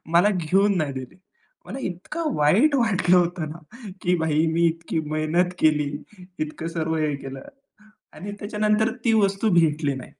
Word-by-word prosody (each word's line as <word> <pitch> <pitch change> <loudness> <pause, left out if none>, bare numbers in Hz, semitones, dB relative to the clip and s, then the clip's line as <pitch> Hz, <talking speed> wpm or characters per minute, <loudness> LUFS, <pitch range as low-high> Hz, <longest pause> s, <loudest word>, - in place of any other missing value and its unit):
मला 180 +5 +6
घेऊन 195 +4 +2
नाही 145 -4 -1
दिले. 130 -1 -8 0.5
मला 270 - -7
इतकं 275 - -4
वाईट 205 - +4
वाटलं 195 -7 +3
होतं 175 -3 0
ना 200 - -12
की 180 0 +2
भाई 160 0 +1
मी 170 +1 +3
इतकी 165 0 -2
मेहनत 165 +4 0
केली. 150 -2 +2 0.5
इतकं 155 +1 -4
सर्व 160 -1 -2
हे 155 -2 0
केलं 135 -1 -8 0.7
आणि 205 +2 -7
त्याच्यानंतर 210 +1 +1
ती 225 - +4
वस्तू 200 +2 +1
भेटली 150 -3 +1
नाही. 130 - -8
170 Hz, 155 wpm, -23 LUFS, 155-200 Hz, 0.7 s, मला